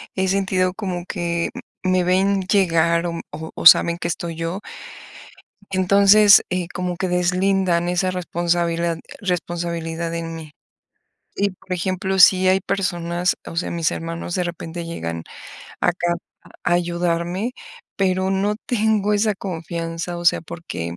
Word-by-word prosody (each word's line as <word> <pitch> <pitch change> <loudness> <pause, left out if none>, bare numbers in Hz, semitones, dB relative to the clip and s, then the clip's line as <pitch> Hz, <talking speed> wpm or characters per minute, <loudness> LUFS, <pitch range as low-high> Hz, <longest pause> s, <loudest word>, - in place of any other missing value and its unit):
he 190 0 0
sentido 185 -1 +1
como 185 -4 -4
que 170 -3 -2
m - - -8 0.2
me 185 -1 +2
ven 195 +2 +2
llegar 170 -3 +2
o 170 -1 -4
o 160 +2 -7
o - - -6
saben 170 0 +8
que - - -3
estoy 170 0 -4
yo 165 +5 -3 1.1
entonces, 200 +2 +6
eh, 180 -2 -2
como 180 -1 -3
que 185 - -1
deslindan 180 0 +1
esa 185 +1 0
responsabilad 170 -1 -1 0.2
responsabilidad 170 -2 -3
en 165 0 -4
mí, 160 -2 -9 0.9
y 200 0 +1
por 185 0 -11
ejemplo, 185 +1 -1
sí 185 +1 +7
hay 190 +1 +4
personas, 175 -2 -1
o 165 - -8
sea, 175 - -1
mis 165 -2 0
hermanos 165 +1 -5
de 180 - 0
repente 170 0 -5
llegan 85 - -5 0.6
acá, 175 -1 +1 0.5
a - - +1
ayudarme, 175 +5 -1 0.4
pero 190 -1 +1
no 195 +2 +1
tengo 215 -3 +1
esa 210 0 +2
confianza, 170 -1 -5
o 175 - -7
sea, - - +4
porque 90 - -6
175 Hz, 140 wpm, -21 LUFS, 170-190 Hz, 1.1 s, saben